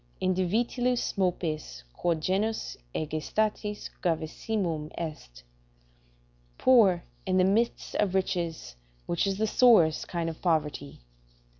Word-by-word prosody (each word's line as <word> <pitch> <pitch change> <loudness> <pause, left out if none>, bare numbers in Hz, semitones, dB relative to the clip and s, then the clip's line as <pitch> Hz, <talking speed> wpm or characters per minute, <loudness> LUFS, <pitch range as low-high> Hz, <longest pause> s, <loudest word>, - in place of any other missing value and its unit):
"In 185 - +1
divitiis 235 +7 0
mopes, 170 - -2
quod 165 - -1
genus 205 +6 -1 0.2
egestatis 205 +7 -2
gravissimum 165 -1 -2
est." 150 - -7 1.1
["Poor 205 -9 +5 0.2
in 185 0 +2
the 185 - +5
midst 215 +5 +1
of 195 -3 +1
riches, 170 - -2 0.3
which 170 +3 0
is 195 -1 -1
the 220 - +1
sorest 215 -9 +4
kind 170 -2 -2
of 165 -1 -6
poverty." 150 - -1
180 Hz, 110 wpm, -28 LUFS, 160-210 Hz, 1.1 s, Poor